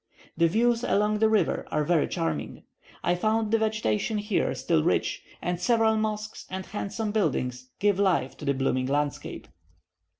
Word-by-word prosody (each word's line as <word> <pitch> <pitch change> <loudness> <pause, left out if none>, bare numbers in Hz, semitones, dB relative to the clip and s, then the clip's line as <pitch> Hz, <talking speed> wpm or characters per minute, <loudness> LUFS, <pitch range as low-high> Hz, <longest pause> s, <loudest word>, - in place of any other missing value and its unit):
The 170 +1 +4
views 230 +6 +2
along 210 -2 +2
the 220 0 +4
river 220 -2 +1
are 150 - 0
very 165 0 +2
charming; 80 -3 -3 0.4
I 175 - +2
found 215 +4 0
the 225 - +3
vegetation 215 0 0
here 210 -1 0
still 165 -2 +1
rich, 175 - 0 0.2
and 175 0 -2
several 225 +2 +3
mosques 215 0 -3
and 190 0 -5
handsome 210 +1 -3
buildings 130 - -1
give 200 -1 +2
life 170 -10 +2
to - - -8
the 140 -1 +1
blooming 130 -1 0
landscape. 145 +1 -2
200 Hz, 160 wpm, -27 LUFS, 150-215 Hz, 0.4 s, The